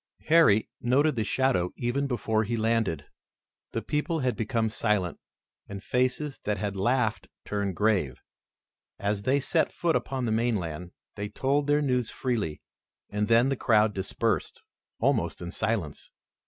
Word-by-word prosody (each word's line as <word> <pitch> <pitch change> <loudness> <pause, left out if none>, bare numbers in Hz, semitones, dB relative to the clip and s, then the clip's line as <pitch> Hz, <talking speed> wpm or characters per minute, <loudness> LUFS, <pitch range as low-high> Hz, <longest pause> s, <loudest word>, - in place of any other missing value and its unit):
Harry 155 -11 +5
noted 140 +5 +3
the 110 - 0
shadow 110 -5 +1
even 130 +4 -1
before 110 -4 0
he 115 +2 -2
landed. 110 -10 0 0.7
The - - -3
people 155 +2 -1
had 125 -1 0
become 115 -1 0
silent, 105 -5 0 0.5
and 100 0 -7
faces 130 +3 0
that 105 0 0
had 100 +1 -3
laughed 110 +2 0 0.2
turned 100 -3 -2
grave. 100 - +1 0.7
As 100 0 -1
they 130 +7 +2
set 160 +4 +1
foot 170 -2 0
upon 130 -2 -1
the 115 - -1
mainland, 90 -7 -1 0.2
they 105 0 -5
told 140 +4 0
their 145 0 +3
news 125 -4 0
freely, 110 - -2 0.5
and 105 0 0
then 115 +4 +4
the 135 - +1
crowd 110 -3 +3
dispersed 95 0 -2 0.4
almost - - +1
in 85 0 -6
silence. 105 -8 -2
110 Hz, 145 wpm, -27 LUFS, 100-130 Hz, 0.7 s, Harry